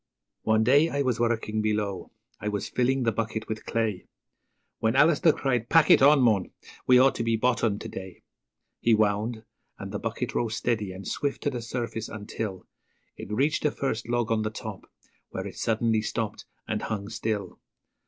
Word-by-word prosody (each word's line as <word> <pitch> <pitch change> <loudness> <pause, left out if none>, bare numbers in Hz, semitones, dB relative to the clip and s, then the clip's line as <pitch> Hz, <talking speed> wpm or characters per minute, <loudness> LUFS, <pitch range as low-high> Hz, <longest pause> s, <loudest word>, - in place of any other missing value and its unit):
One 110 0 +3
day 140 +7 +5
I 140 -1 0
was 125 -4 0
working 115 -2 0
below 105 -3 -2 0.3
I 105 - -4
was 105 -1 -3
filling 130 +1 +1
the 115 - +2
bucket 110 0 -3
with 110 0 -5
clay, 110 -5 -1 0.7
When 110 +2 +1
Alister 155 +3 +5
cried, 125 -5 -1
'Pack 165 -3 +5
it - - +7
on, 140 +1 +7
mon! 105 -6 +3 0.4
we 125 - +7
ought 135 +2 +6
to 115 - -3
be 115 0 +1
bottomed 115 -3 +1
to - - -6
day.' 95 -1 -9 0.6
He 115 -1 +4
wound, 110 +2 0 0.3
and - - -7
the - - -3
bucket - - -3
rose 115 -2 -1
steady 110 -5 -1
and 95 +1 -8
swift 140 -1 -2
to 145 - +1
the 125 -3 -4
surface 115 -2 -4
until 105 -2 -5 0.5
It - - -9
reached 140 +8 +1
the 150 - +2
first 120 -5 -3
log 120 -1 0
on 110 -1 +2
the 110 - -1
top, 110 - -8 0.4
where - - -5
it - - -7
suddenly 110 -1 +1
stopped, 105 0 -3 0.2
and 105 -1 -2
hung 100 -3 -3
still. 105 -3 -3
115 Hz, 185 wpm, -27 LUFS, 105-125 Hz, 0.7 s, it